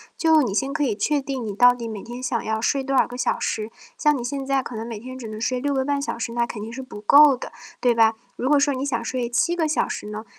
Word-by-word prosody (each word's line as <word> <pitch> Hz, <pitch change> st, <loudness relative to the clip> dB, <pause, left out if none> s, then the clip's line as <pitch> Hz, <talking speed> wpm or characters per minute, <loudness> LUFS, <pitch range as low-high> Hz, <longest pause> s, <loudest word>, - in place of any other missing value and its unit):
就 320 Hz, -3 st, +4 dB
你 205 Hz, -5 st, -2 dB
先 270 Hz, +6 st, 0 dB
可 300 Hz, -1 st, -1 dB
以 235 Hz, -6 st, +1 dB
确 285 Hz, +8 st, +1 dB
定 270 Hz, -3 st, -4 dB
你 205 Hz, -2 st, -4 dB
到 245 Hz, +2 st, +6 dB
底 235 Hz, -2 st, -6 dB
每 215 Hz, -3 st, -6 dB
天 240 Hz, +2 st, -8 dB
想 245 Hz, -2 st, -2 dB
要 220 Hz, 0 st, -1 dB
睡 275 Hz, +3 st, +1 dB
多 270 Hz, 0 st, -1 dB
少 -, -, +4 dB
个 245 Hz, -, -8 dB
小 -, -, 0 dB
时， 220 Hz, 0 st, -2 dB, 0.3 s
像 300 Hz, -1 st, +3 dB
你 245 Hz, -, -4 dB
现 275 Hz, +2 st, -3 dB
在 275 Hz, 0 st, +1 dB
可 250 Hz, -, -8 dB
能 220 Hz, +1 st, -4 dB
每 225 Hz, -3 st, -6 dB
天 255 Hz, +2 st, -9 dB
只 235 Hz, -4 st, -7 dB
能 215 Hz, 0 st, -7 dB
睡 250 Hz, +1 st, 0 dB
6 285 Hz, +1 st, -1 dB
个 265 Hz, -1 st, +1 dB
半 285 Hz, 0 st, 0 dB
小 255 Hz, -4 st, -4 dB
时， 230 Hz, 0 st, -3 dB
那 235 Hz, 0 st, +1 dB
肯 230 Hz, -3 st, -7 dB
定 220 Hz, +2 st, -6 dB
是 265 Hz, +2 st, -6 dB
不 210 Hz, -5 st, -10 dB
够 285 Hz, +5 st, +7 dB
的， -, -, -8 dB, 0.3 s
对 245 Hz, -2 st, +2 dB
吧？ 225 Hz, -1 st, +5 dB, 0.2 s
如 255 Hz, -, -3 dB
果 290 Hz, 0 st, +4 dB
说 285 Hz, -1 st, +2 dB
你 260 Hz, +2 st, -3 dB
想 235 Hz, -4 st, -1 dB
睡 245 Hz, 0 st, -2 dB
7 245 Hz, +9 st, +1 dB
个 320 Hz, -3 st, +1 dB
小 305 Hz, -, +1 dB
时 -, -, -5 dB
呢， 215 Hz, +1 st, -6 dB
250 Hz, 310 characters per minute, -23 LUFS, 230-275 Hz, 0.3 s, 够